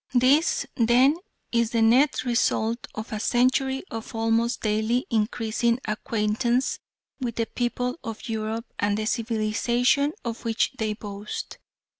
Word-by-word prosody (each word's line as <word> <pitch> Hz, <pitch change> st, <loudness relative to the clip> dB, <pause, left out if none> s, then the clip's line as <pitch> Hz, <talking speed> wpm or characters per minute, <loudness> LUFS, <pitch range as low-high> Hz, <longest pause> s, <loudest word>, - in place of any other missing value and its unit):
This, 270 Hz, +7 st, +4 dB
then, 250 Hz, +4 st, +4 dB, 0.4 s
is 235 Hz, -1 st, +2 dB
the 230 Hz, -1 st, +1 dB
net 255 Hz, +7 st, +4 dB
result 235 Hz, -1 st, 0 dB
of 220 Hz, +1 st, -6 dB
a 215 Hz, -, -2 dB
century 260 Hz, +3 st, +2 dB
of 225 Hz, 0 st, -6 dB
almost 225 Hz, +2 st, +1 dB
daily 220 Hz, +3 st, +1 dB
increasing 225 Hz, +1 st, +1 dB
acquaintance 225 Hz, +3 st, 0 dB, 0.4 s
with 240 Hz, -4 st, -3 dB
the 230 Hz, -, 0 dB
people 245 Hz, +5 st, -2 dB
of 225 Hz, -1 st, -6 dB
Europe 220 Hz, 0 st, -3 dB
and 205 Hz, 0 st, +1 dB
the 215 Hz, -, -2 dB
civilisation 235 Hz, +5 st, +1 dB
of 230 Hz, -1 st, -4 dB
which 230 Hz, -1 st, +1 dB
they 215 Hz, -1 st, 0 dB
boast. 205 Hz, -1 st, -7 dB
230 Hz, 130 wpm, -25 LUFS, 220-245 Hz, 0.4 s, This